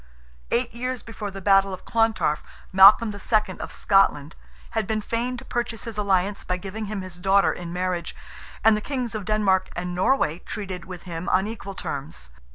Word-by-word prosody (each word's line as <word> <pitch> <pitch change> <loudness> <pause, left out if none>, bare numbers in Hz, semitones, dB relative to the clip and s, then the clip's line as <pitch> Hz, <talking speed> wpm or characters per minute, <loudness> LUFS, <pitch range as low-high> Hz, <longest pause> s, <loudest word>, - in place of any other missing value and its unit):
Eight 240 -1 0
years 250 +1 -3
before 220 -2 -6
the 195 -1 -9
battle 195 -1 +4
of 185 - -19
Clontarf, 225 -9 +1 0.3
Malcolm 200 +3 +8
II., 205 -1 0
of - - -6
Scotland, 165 -7 +2 0.4
had 220 -3 -1
been 220 -1 0
feign 235 +4 -2
to 240 - -10
purchase 235 -3 -3
his 230 -2 -6
alliance, 200 -1 0
by 180 - -2
giving 200 +4 -6
him 205 -1 -4
his 180 -1 -10
daughter 195 +2 +3
in 175 -1 -7
marriage, 180 -1 -2 0.5
and 220 -1 +6
the 210 - -2
Kings 250 -2 -3
of 215 -3 -4
Denmark 205 -3 +2
and 180 +1 -3
Norway 180 - +1
treated 185 -3 -6
with 180 -1 -9
him 170 0 -5
on 190 +1 +3
equal 210 -3 -7
terms. 135 - -6
200 Hz, 180 wpm, -24 LUFS, 185-220 Hz, 0.5 s, Malcolm